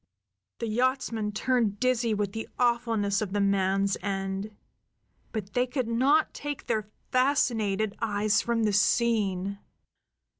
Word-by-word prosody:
The 230 Hz, -, -3 dB
yachtsmen 230 Hz, -2 st, 0 dB
turned 220 Hz, -2 st, 0 dB
dizzy 245 Hz, -3 st, +1 dB
with 205 Hz, -2 st, -1 dB
the 225 Hz, +1 st, -6 dB
awfulness 230 Hz, -4 st, +1 dB
of 200 Hz, -2 st, -3 dB
the 205 Hz, -, +1 dB
man's 195 Hz, 0 st, +2 dB
end; 195 Hz, +1 st, -3 dB, 0.8 s
but 210 Hz, -3 st, -5 dB
they 250 Hz, +1 st, +2 dB
could 255 Hz, -2 st, -2 dB
not 265 Hz, +7 st, +3 dB
take 290 Hz, -2 st, -5 dB
their 215 Hz, -2 st, -1 dB, 0.2 s
fascinated 220 Hz, -6 st, +1 dB
eyes 215 Hz, 0 st, +2 dB
from 235 Hz, -1 st, 0 dB
the 210 Hz, -1 st, +1 dB
scene. 200 Hz, -3 st, +1 dB
220 Hz, 125 wpm, -28 LUFS, 200-240 Hz, 0.8 s, not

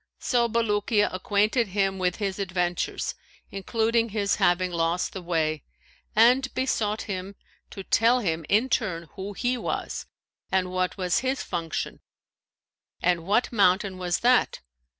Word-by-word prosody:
So 235 Hz, -1 st, +1 dB
Bulukiya 210 Hz, -2 st, +1 dB
acquainted 210 Hz, +5 st, +1 dB
him 195 Hz, 0 st, 0 dB
with 180 Hz, -1 st, 0 dB
his 200 Hz, -2 st, -3 dB
adventures 180 Hz, -2 st, -1 dB, 0.4 s
including 225 Hz, +3 st, 0 dB
his 200 Hz, -2 st, 0 dB
having 180 Hz, +1 st, +2 dB
lost 170 Hz, +1 st, 0 dB
the 190 Hz, -, -6 dB
way; 160 Hz, -4 st, -1 dB, 0.5 s
and 250 Hz, +4 st, +5 dB
besought 220 Hz, -5 st, 0 dB
him 195 Hz, -1 st, -5 dB, 0.3 s
to 195 Hz, -, -8 dB
tell 230 Hz, +5 st, +3 dB
him, 165 Hz, -7 st, -1 dB
in 215 Hz, +6 st, +3 dB
turn, 175 Hz, -10 st, -1 dB
who 200 Hz, +1 st, -6 dB
he 245 Hz, +4 st, -1 dB
was -, -, -4 dB, 0.4 s
and 185 Hz, -1 st, +1 dB
what 185 Hz, +1 st, -1 dB
was 180 Hz, 0 st, +1 dB
his 260 Hz, +2 st, -1 dB
function 165 Hz, -3 st, -4 dB, 1.0 s
and 170 Hz, -1 st, 0 dB
what 215 Hz, +5 st, +2 dB
mountain 195 Hz, -2 st, +2 dB
was 175 Hz, -1 st, -1 dB
that. 250 Hz, +1 st, +3 dB
195 Hz, 135 wpm, -26 LUFS, 180-225 Hz, 1.0 s, and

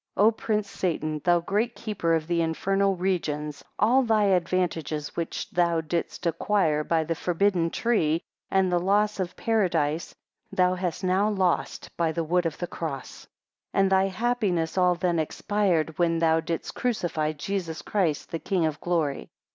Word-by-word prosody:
9 205 Hz, -, +5 dB
O 225 Hz, -, +7 dB
prince 215 Hz, -2 st, -1 dB
Satan, 155 Hz, -6 st, -2 dB
thou 175 Hz, -1 st, +3 dB
great 215 Hz, +7 st, -1 dB
keeper 180 Hz, -7 st, -1 dB
of 160 Hz, -1 st, -1 dB
the 170 Hz, 0 st, 0 dB
infernal 195 Hz, +4 st, +1 dB
regions, 150 Hz, -5 st, -2 dB
all 240 Hz, +6 st, +4 dB
thy 220 Hz, -4 st, +2 dB
advantages 175 Hz, -5 st, 0 dB
which 170 Hz, -, -3 dB
thou 170 Hz, -1 st, +2 dB
didst 165 Hz, +2 st, -3 dB
acquire 165 Hz, -2 st, +1 dB
by 160 Hz, 0 st, +1 dB
the 165 Hz, +1 st, -1 dB
forbidden 175 Hz, 0 st, +1 dB
tree, 165 Hz, -8 st, +1 dB, 0.3 s
and 190 Hz, -1 st, +2 dB
the 175 Hz, -, +3 dB
loss 205 Hz, +3 st, +1 dB
of 180 Hz, -1 st, -3 dB
Paradise, 170 Hz, -8 st, 0 dB, 0.4 s
thou 180 Hz, 0 st, +3 dB
hast 180 Hz, -1 st, -3 dB
now 190 Hz, +3 st, +2 dB
lost 190 Hz, -4 st, -1 dB
by 165 Hz, -2 st, +1 dB
the 165 Hz, +1 st, -2 dB
wood 175 Hz, +2 st, +1 dB
of 160 Hz, -, -5 dB
the 175 Hz, -, -3 dB
cross; 155 Hz, -6 st, -6 dB, 0.5 s
10 -, -, +3 dB
And 195 Hz, -, +1 dB
thy 190 Hz, 0 st, +4 dB
happiness 195 Hz, -5 st, 0 dB
all 180 Hz, -1 st, +3 dB
then 175 Hz, -1 st, 0 dB
expired, 170 Hz, -1 st, 0 dB
when 165 Hz, -1 st, +2 dB
thou 165 Hz, -1 st, +3 dB
didst 165 Hz, 0 st, -4 dB
crucify 170 Hz, -10 st, -1 dB
Jesus 165 Hz, +1 st, -4 dB
Christ 175 Hz, -8 st, -1 dB
the 165 Hz, -, -2 dB
King 180 Hz, -2 st, 0 dB
of 155 Hz, -1 st, -2 dB
Glory. 165 Hz, -5 st, -1 dB
175 Hz, 165 wpm, -26 LUFS, 160-195 Hz, 0.5 s, O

